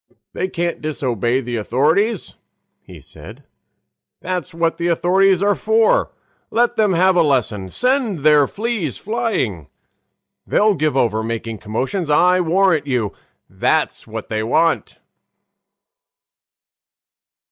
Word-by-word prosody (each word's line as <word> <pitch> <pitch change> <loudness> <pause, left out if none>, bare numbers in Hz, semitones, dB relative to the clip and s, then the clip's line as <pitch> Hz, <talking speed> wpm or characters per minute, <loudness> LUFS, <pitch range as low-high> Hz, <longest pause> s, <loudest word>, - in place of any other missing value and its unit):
"They 185 - -2
can't 175 -2 -3
disobey 130 -5 -1
the 120 -1 -4
authorities," 155 - 0 0.5
he - - -13
said; - - -13 0.8
"that's 180 -5 -4
what 165 0 -1
the 170 - -2
authorities 185 +3 +2
are 205 0 +3
for. 220 +2 +2 0.4
Let 240 +1 +1
them 210 -4 +2
have 185 +2 +3
a 175 - +4
lesson; 120 - 0
send 250 - 0
their 150 -2 +5
fleas 205 - -3
flying! 210 - -2 0.8
They'll 210 0 +3
give 155 -5 -1
over 110 -4 +1
making 115 -1 -5
commotions, 130 - -3
I 180 +5 +4
warrant 180 -2 +2
you. 120 -7 -1 0.4
That's - - -1
what - - -7
they 110 0 -2
want." 155 +9 0
165 Hz, 115 wpm, -19 LUFS, 125-195 Hz, 0.8 s, their